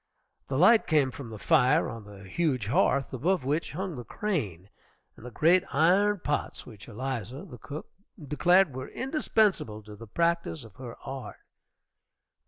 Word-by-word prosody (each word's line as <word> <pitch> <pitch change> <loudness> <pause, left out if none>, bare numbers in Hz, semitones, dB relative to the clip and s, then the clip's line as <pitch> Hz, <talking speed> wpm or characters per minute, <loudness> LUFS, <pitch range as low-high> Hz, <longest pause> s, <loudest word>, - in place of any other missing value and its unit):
The 135 - -2
light 215 +8 +6
came 145 -5 +3
from 125 -2 -8
the 110 - -8
fire 150 +4 +3
on 110 -2 -7
the 100 -1 -12
huge 130 - 0
hearth, 135 +5 +2
above 155 +3 0
which 150 +4 -1
hung 185 +1 -4
the 120 - -6
crane 105 - -3 0.4
and - - -15
the 125 - -7
great 170 +8 +4
iron 190 +6 +3
pots 145 - -2
which 110 -4 -12
Eliza, 130 - -5
the 125 -10 -11
cook, 150 +1 -7 0.3
declared 170 +3 +3
were 130 0 -6
indispensable 215 - 0
in 105 -1 -11
the 115 +2 -11
practice 170 +2 0
of 110 -3 -14
her 125 -3 -8
art. 135 -1 -7
140 Hz, 160 wpm, -28 LUFS, 115-170 Hz, 0.4 s, light